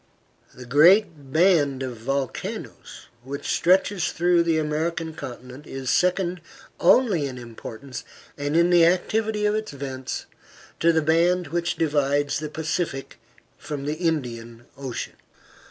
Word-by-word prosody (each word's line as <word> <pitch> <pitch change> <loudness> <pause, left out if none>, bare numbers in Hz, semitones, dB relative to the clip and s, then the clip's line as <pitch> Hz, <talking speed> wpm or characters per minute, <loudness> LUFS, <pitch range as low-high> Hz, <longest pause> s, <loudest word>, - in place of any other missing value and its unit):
The 125 - -10
great 155 - +4
band 155 -5 +3
of 125 -2 -4
volcanoes 135 +3 -5 0.2
which 140 +2 -6
stretches 185 0 +2
through 175 0 +3
the 165 -1 +1
American 160 +2 -2
continent 130 +1 -9
is 135 -1 -3
second 180 -1 +1 0.4
only 200 - +4
in 130 -2 -7
importance, 120 +2 -8 0.3
and 145 +2 -1
in 170 +1 +4
the 175 -1 +6
activity 210 +5 +1
of 210 - +2
its 215 -6 -3
vents, 130 -2 -5 0.5
to 170 - +4
the 160 -1 +1
band 170 +3 +2
which 170 0 -1
divides 145 -2 +1
the 155 -1 -5
Pacific 155 -2 -3 0.4
from 145 -2 -5
the 150 - -1
Indian 120 -8 -3
Ocean. 135 -3 -6
155 Hz, 130 wpm, -24 LUFS, 135-175 Hz, 0.5 s, the